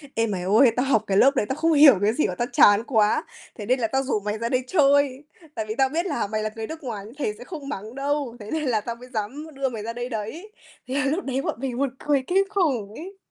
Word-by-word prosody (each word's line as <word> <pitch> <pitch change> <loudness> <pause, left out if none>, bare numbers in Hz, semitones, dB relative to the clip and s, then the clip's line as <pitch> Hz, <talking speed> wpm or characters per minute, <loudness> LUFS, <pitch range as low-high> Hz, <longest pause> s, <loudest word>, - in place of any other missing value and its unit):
"Ê, 230 0 +1
mày 195 -4 -3
ơi, 220 +7 +5
tao 250 - +1
học 260 -6 +2
cái 195 - +1
lớp 275 +6 +5
đấy, 235 - +1
tao 265 - -1
không 325 +2 +2
hiểu 285 -6 +8
cái 210 +2 +2
gì 300 - +1
và - - -4
tao 240 - -2
chán 205 -1 +6
quá. 220 -5 +2 0.3
Thế 210 - -6
nên 255 +4 +1
là 230 - +1
tao 265 +3 0
rủ 260 -5 -1
mày 210 +1 -3
ra 230 +1 -3
đây 255 +1 0
chơi. 285 -3 +3 0.3
Tại 220 - -3
vì 215 0 -4
tao 265 -1 +3
biết 330 +5 -1
là 240 - -1
mày 215 +1 -2
là 215 - -1
người 225 -1 -5
nước 320 0 -8
ngoài 215 -6 -5
nên 220 - -12
thầy 245 -8 -1
sẽ - - -10
không 290 -1 -8
mắng 220 -2 -6
đâu. 280 -3 -2
Thế 210 -1 -9
nên 315 -1 -1
là 235 -6 +1
tao 235 +2 -5
mới 250 +2 -14
dám 240 +8 -4
đưa 270 0 -1
mày 225 -4 -6
ra 230 +1 -4
đây 245 +1 -5
đấy." 250 - -6 0.4
Thế 255 - -4
là 285 +1 +1
lúc 310 +7 -1
đấy 270 0 -1
bọn - - -3
mình 260 -2 -3
buồn 270 -1 -1
cười 285 -3 +1
kinh 385 +2 +3
khủng 270 - 0
ấy. 385 +5 -9
255 Hz, 290 wpm, -24 LUFS, 220-285 Hz, 0.4 s, hiểu